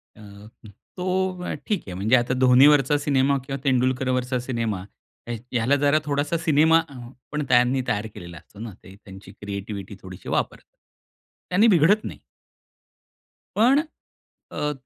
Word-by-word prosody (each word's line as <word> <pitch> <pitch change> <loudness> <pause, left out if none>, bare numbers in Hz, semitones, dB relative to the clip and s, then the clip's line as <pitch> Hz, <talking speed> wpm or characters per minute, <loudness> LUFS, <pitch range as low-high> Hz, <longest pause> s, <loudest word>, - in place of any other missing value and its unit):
अ, - - -18
हं, 105 +2 -15 0.3
तो 185 0 -2
ठीक 210 -4 -1
आहे 90 - -6
म्हणजे 105 +7 +2
आता 120 +1 +1
धोनीवरचा 135 +3 +5
सिनेमा 140 -1 +1
किंवा 135 0 -4
तेंडुलकरवरचा 130 -1 0
सिनेमा 115 -6 -3 0.4
या 120 - -3 0.2
याला 120 +5 +2
जरा 145 +2 +4
थोडासा 145 +3 -1
सिनेमा 160 0 +4
अ, 140 - -13 0.4
पण 150 0 -2
त्यांनी 125 +1 +3
तयार 105 +1 -1
केलेला 85 -1 -10
असतो 100 - -17
ना. 110 -2 -7
ते 95 -3 -14
त्यांची 95 0 -12
क्रिएटिविटी 100 0 -7
थोडीशी 95 -1 -10
वापरतात. - - -3 0.7
त्यांनी 200 +6 +4
बिघडत 200 +2 +4
नाही. - - -7 1.4
पण 255 +7 +4 0.7
अ, 150 0 -2
130 Hz, 135 wpm, -23 LUFS, 110-150 Hz, 1.4 s, धोनीवरचा